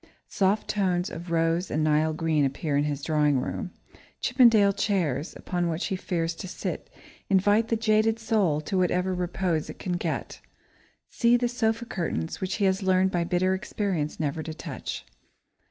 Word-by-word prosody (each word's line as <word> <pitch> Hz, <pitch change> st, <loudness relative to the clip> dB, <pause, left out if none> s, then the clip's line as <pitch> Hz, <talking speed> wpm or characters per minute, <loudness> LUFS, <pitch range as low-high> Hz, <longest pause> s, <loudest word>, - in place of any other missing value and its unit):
Soft 200 Hz, +2 st, +1 dB
tones 185 Hz, -2 st, 0 dB
of 170 Hz, +2 st, -7 dB
rose 165 Hz, +2 st, +1 dB
and 155 Hz, -, 0 dB
Nile 155 Hz, +1 st, +2 dB
green 155 Hz, -1 st, +1 dB
appear 140 Hz, +2 st, -1 dB
in 145 Hz, +1 st, +2 dB
his 145 Hz, -1 st, -3 dB
drawing 150 Hz, -3 st, +2 dB
room. 180 Hz, -, -4 dB, 0.5 s
Chippendale 230 Hz, -6 st, +5 dB
chairs, 175 Hz, -, -1 dB
upon 175 Hz, -1 st, -2 dB
which 165 Hz, +2 st, -2 dB
he 190 Hz, -, -1 dB
fears 170 Hz, -2 st, -2 dB
to 185 Hz, -, -6 dB
sit, 185 Hz, -, -5 dB, 0.4 s
invite 205 Hz, +3 st, +3 dB
the 230 Hz, -, +1 dB
jaded 220 Hz, 0 st, +2 dB
soul 210 Hz, -9 st, +1 dB
to 185 Hz, +5 st, -1 dB
whatever 180 Hz, +1 st, +1 dB
repose 180 Hz, -2 st, -1 dB
it -, -, -8 dB
can 180 Hz, -2 st, -2 dB
get. -, -, -4 dB, 0.7 s
See 235 Hz, 0 st, +4 dB
the 245 Hz, 0 st, 0 dB
sofa 235 Hz, -1 st, 0 dB
cushions, 165 Hz, -, -3 dB
which 190 Hz, 0 st, -1 dB
he 205 Hz, -, +1 dB
has 190 Hz, +1 st, +2 dB
learned 190 Hz, 0 st, +3 dB
by 175 Hz, -2 st, +1 dB
bitter 180 Hz, +2 st, +1 dB
experience 190 Hz, -5 st, -2 dB
never 155 Hz, 0 st, -1 dB
to 155 Hz, 0 st, -6 dB
touch! -, -, -6 dB
180 Hz, 170 wpm, -26 LUFS, 160-205 Hz, 0.7 s, Chippendale